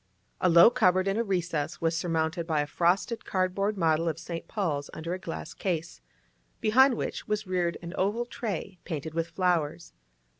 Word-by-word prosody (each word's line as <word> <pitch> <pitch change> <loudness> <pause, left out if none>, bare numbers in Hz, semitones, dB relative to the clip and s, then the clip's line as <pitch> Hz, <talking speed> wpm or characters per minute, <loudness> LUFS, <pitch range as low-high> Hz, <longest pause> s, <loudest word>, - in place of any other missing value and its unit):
A 180 - +3
low 170 +6 +8
cupboard 185 -6 +3
in 195 +2 +1
a 230 - +2
recess 175 -7 -2
was 165 0 +1
surmounted 165 0 -1
by 155 -3 +1
a - - -1
frosted 180 +9 +1
cardboard 195 +2 0
model 165 -1 +2
of 155 - -3
St. 170 0 -6
Paul's 155 -9 -2
under 165 +2 -4
a 185 - -4
glass 165 -3 -6
case, 165 - -3 0.6
behind 260 +4 +5
which - - -4
was 210 0 -1
reared 180 -2 0
an 170 +1 -6
oval 210 +5 0
tray 195 -6 -5
painted 160 -2 -5
with 165 0 -1
flowers. 170 -2 -1
175 Hz, 175 wpm, -28 LUFS, 165-195 Hz, 0.6 s, low